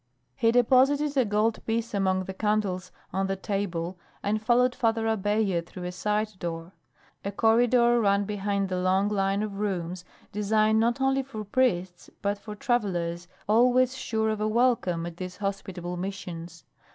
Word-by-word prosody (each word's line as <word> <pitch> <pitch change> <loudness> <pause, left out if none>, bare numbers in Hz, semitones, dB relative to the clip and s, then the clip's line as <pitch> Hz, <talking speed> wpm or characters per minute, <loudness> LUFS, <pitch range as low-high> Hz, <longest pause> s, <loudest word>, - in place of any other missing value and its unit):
He 230 - +3
deposited 270 +4 +3
a 260 -3 +3
gold 215 +2 0
piece 230 +1 -1
among 190 -2 +1
the 190 - -6
candles 195 -3 -1 0.2
on 190 +1 0
the 195 - -1
table 190 -3 -3 0.2
and 210 +2 0
followed 245 +2 +3
Father 225 -2 0
Abella 205 -4 +1
through 180 +2 -10
a 180 - -3
side 210 +2 -2
door. 165 0 -5 0.5
A 200 - -3
corridor 235 +2 +4
ran 200 -1 +2
behind 200 -1 -1
the 185 -1 -1
long 190 +2 +2
line 195 0 0
of 200 -2 -5
rooms 180 -3 -2 0.3
designed 215 +1 +2
not 235 +3 +1
only 270 0 +2
for 255 -5 -7
priests 185 -6 0
but 200 0 0
for 210 0 -8
travellers 175 -7 -1 0.2
always 250 +4 +4
sure 220 -4 -1
of 215 -1 -3
a 215 - +1
welcome 215 -7 +1
at 170 -1 -7
these 180 0 -6
hospitable 190 -3 -4
Missions. 175 -3 -6
205 Hz, 160 wpm, -27 LUFS, 185-225 Hz, 0.5 s, corridor